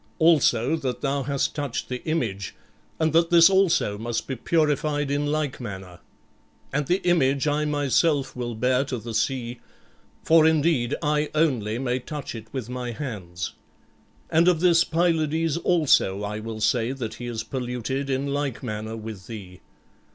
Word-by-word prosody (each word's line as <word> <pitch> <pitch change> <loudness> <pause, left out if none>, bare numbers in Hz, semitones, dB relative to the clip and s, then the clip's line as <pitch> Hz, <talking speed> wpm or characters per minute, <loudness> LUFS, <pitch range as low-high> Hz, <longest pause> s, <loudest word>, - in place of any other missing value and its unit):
Also 155 -5 +4
that 125 -5 -3
thou 140 0 0
hast 140 0 -1
touched 145 -5 -3
the 125 -1 -5
image, 110 - -2 0.4
and 160 -1 +1
that 165 +1 +4
this 170 +1 +7
also 180 - +2
must 120 +1 -2
be 130 - -4
purified 150 0 0
in 145 +1 0
like 150 -3 -2
manner. 95 -5 -8 0.7
And 145 -1 0
the 180 +2 +1
image 140 -6 +3
I 150 +1 +1
myself 145 0 +1
will 120 -2 -4
bear 125 +3 +2
to 130 -2 -3
the 115 +1 -7
sea; 120 0 -1 0.6
for, 160 -1 +5
indeed, 150 -5 +2
I 150 0 +1
only 125 -9 +1
may 125 0 -1
touch 145 +2 -6
it 115 -1 -8
with 130 -5 -4
my 125 -1 -4
hands. 95 - -5 0.8
And 165 +2 +4
of 180 -3 +4
this 170 -1 +5
Pylades 165 -2 +1
also 150 - +2
I 105 +1 -3
will 110 0 -6
say 115 +3 +1
that 120 -5 -5
he 120 - -4
is 115 -2 -3
polluted 130 +2 -3
in 135 +1 0
like 140 -3 -2
manner 110 -1 -4
with 110 -4 -8
thee. 95 -6 -9
135 Hz, 160 wpm, -25 LUFS, 115-155 Hz, 0.8 s, this